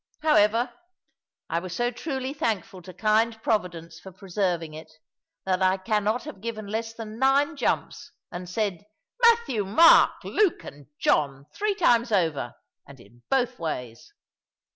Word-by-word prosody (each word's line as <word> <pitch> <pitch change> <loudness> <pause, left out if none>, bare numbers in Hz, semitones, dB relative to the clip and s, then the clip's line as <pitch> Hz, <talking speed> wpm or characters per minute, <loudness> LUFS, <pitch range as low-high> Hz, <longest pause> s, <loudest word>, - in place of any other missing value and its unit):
However, 240 -4 +3 0.7
I 165 - -1
was 175 -1 -7
so 240 +4 0
truly 265 0 -4
thankful 225 - -3
to 185 +1 -11
kind 220 +4 +1
Providence 170 -6 -2
for 190 - -11
preserving 180 -4 -2
it, 155 0 -11 0.5
that 185 -1 0
I 185 0 +3
cannot 215 +3 -1
have 190 - -10
given 220 -2 -5
less 225 +2 -3
than 225 -1 -9
nine 275 +4 +3
jumps, - - -2 0.2
and 180 0 -7
said, 200 -2 -2 0.4
"Matthew, 465 - +4
Mark, 320 - +5
Luke, 415 -5 +1
and 145 -1 -12
John," 140 -2 +1
three 415 -1 -1
times 240 - +3
over, 160 - 0 0.3
and 140 -2 -14
in 120 +2 -19
both 255 -2 0
ways. 125 -8 -6
210 Hz, 140 wpm, -25 LUFS, 175-240 Hz, 0.7 s, Mark